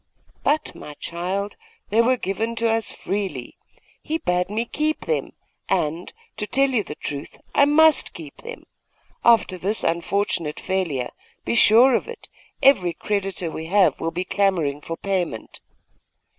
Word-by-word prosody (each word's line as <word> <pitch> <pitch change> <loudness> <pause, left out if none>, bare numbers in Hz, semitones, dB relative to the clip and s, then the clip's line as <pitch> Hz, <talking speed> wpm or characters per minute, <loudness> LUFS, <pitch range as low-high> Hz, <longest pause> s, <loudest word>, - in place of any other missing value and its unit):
'But, 305 +2 0
my 150 - -10
child, 185 +6 -3 0.3
they 225 +2 +5
were 255 +2 +3
given 220 +3 -2
to 230 0 +1
us 225 -1 0
freely. 190 -12 -4 0.5
He 315 - -2
bade 180 - 0
me 220 +3 -1
keep 305 +5 -1
them; 470 - -1 0.4
and - - +3 0.2
and, - - -20 0.2
to 210 - -3
tell 275 +3 +3
you 230 -5 +1
the 150 - -7
truth, 145 -1 -6 0.2
I 285 - +6
must 305 0 +4
keep 155 -4 -10
them. 480 +1 -9 0.6
After 225 -6 +4
this 205 +5 -1
unfortunate 170 -2 0
failure, 170 -10 -2 0.3
be - - 0
sure 235 +3 +6
of - - +1
it, 470 -1 -10 0.3
every 185 -11 +5
creditor 195 -5 -2
we 160 +1 -6
have 195 +1 +3
will 165 - -1
be 180 +2 -3
clamouring 175 -8 +1
for 165 +2 -5
payment. 180 - -3
200 Hz, 155 wpm, -23 LUFS, 170-235 Hz, 0.6 s, I